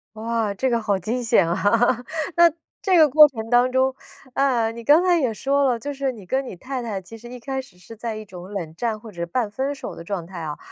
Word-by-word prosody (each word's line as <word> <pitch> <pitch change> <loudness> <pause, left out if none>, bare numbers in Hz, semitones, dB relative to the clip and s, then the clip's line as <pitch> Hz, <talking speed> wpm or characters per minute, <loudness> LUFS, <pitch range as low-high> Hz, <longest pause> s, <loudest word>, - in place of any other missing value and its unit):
哇， 225 -1 -1
这 260 +6 0
个 235 -1 +1
好 205 -2 +1
惊 225 +7 -2
险 225 -6 +3
啊。 175 - -1 0.8
那 340 0 +8 0.3
这 375 -3 +2
个 310 -2 +7
过 300 +2 +8
程 225 -5 -7
当 245 +1 +4
中， 260 +1 +2 0.4
呃， 245 -5 +2
你 235 0 -8
刚 300 +9 +5
才 355 -2 +4
也 245 -6 0
说 280 +5 +1
了， 250 -3 +2
就 285 +5 -5
是 270 -1 -2
你 210 -5 -12
跟 265 +7 -1
你 - - -7
太 260 +6 -5
太 210 -5 -4
其 225 +5 -12
实 240 - -12
一 250 - -8
开 265 +2 -4
始， 195 -8 -19
是 220 +5 -13
在 230 -1 -4
一 215 - -6
种 185 -1 -11
冷 165 -5 -5
战 225 0 -1
或 215 0 -12
者 - - -20
是 - - 0
半 210 +5 -2
分 270 +6 -2
手 - - -7
的 170 - -10
状 185 -4 -4
态 180 0 -9
啊， 155 -2 -5
235 Hz, 275 characters per minute, -23 LUFS, 205-265 Hz, 0.8 s, 那